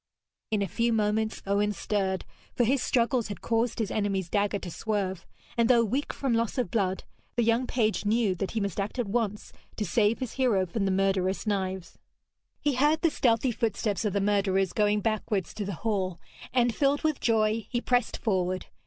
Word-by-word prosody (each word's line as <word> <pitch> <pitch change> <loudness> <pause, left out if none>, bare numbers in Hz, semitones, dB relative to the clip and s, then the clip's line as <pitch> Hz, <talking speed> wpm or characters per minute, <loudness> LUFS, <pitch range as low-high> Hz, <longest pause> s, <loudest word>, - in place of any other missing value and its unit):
In 210 -2 +1
a - - -1
few 235 +6 0
moments 215 0 0
Owen 205 +1 +1
stirred, 190 -2 -1 0.3
for 245 - +3
his 260 +3 +2
struggles 235 -1 +1
had 205 - -7
caused 230 0 0
his 220 -4 -1
enemy's 195 -4 -1
dagger 205 0 +1
to 185 -3 -7
swerve, 190 -3 -2 0.3
and 235 -1 +2
though 235 -2 +5
weak 260 +7 -1
from 270 -3 -1
loss 230 +2 0
of 250 - -1
blood, 190 -5 0 0.3
the 240 - +2
young 230 +3 +2
page 220 -3 0
knew 215 -1 +2
that 185 +1 -3
he 225 - -2
must 200 -2 -2
act 200 +5 -3
at 245 - 0
once 210 -1 -2 0.2
to 210 - -2
save 210 +4 +2
his 255 -3 -4
hero 235 -8 +2
from 195 +3 -2
the 195 - +1
murderous 190 0 +1
knives. 190 -4 -2 0.6
He 290 -2 +1
heard 295 +5 +3
the 330 - +4
stealthy 240 -1 +2
footsteps 215 -2 -1
of 210 -3 0
the 200 - +1
murderers 195 -2 +1
going 210 0 +2
backwards 215 -3 -1
to 205 - -4
the 195 -2 -4
hall, 190 -5 0 0.3
and, 245 -2 +2
filled 285 +3 +1
with 310 -3 +1
joy, 220 -1 +1
he 240 - 0
pressed 245 0 +1
forward. 185 -4 -1
215 Hz, 195 wpm, -28 LUFS, 195-235 Hz, 0.6 s, though